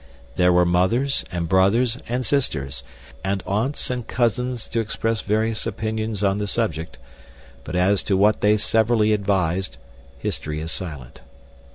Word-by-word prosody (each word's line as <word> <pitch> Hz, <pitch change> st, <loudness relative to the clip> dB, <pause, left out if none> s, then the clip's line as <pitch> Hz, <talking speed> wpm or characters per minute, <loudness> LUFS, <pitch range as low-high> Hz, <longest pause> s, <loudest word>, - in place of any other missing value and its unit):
There 90 Hz, 0 st, +4 dB
were 90 Hz, 0 st, +4 dB
mothers 105 Hz, +11 st, +2 dB
and 85 Hz, -2 st, -2 dB
brothers 110 Hz, +8 st, +3 dB
and 125 Hz, +1 st, -1 dB
sisters, 75 Hz, -, -1 dB, 0.4 s
and 95 Hz, -1 st, -1 dB
aunts 115 Hz, +8 st, -1 dB
and 125 Hz, -2 st, -4 dB
cousins 125 Hz, 0 st, -1 dB
to 115 Hz, -, -1 dB
express 115 Hz, 0 st, -1 dB
various 110 Hz, +2 st, 0 dB
opinions 110 Hz, -1 st, -3 dB
on 100 Hz, 0 st, +2 dB
the 105 Hz, -, -2 dB
subject, 85 Hz, -, -2 dB, 0.7 s
but -, -, -6 dB
as 95 Hz, +1 st, +3 dB
to 95 Hz, -, +2 dB
what 105 Hz, +2 st, +3 dB
they 105 Hz, +1 st, +4 dB
severally 110 Hz, 0 st, +2 dB
advised 95 Hz, -7 st, 0 dB, 0.4 s
history 75 Hz, +4 st, -3 dB
is 80 Hz, +1 st, -5 dB
silent. 75 Hz, -9 st, -6 dB
105 Hz, 145 wpm, -22 LUFS, 90-115 Hz, 0.7 s, There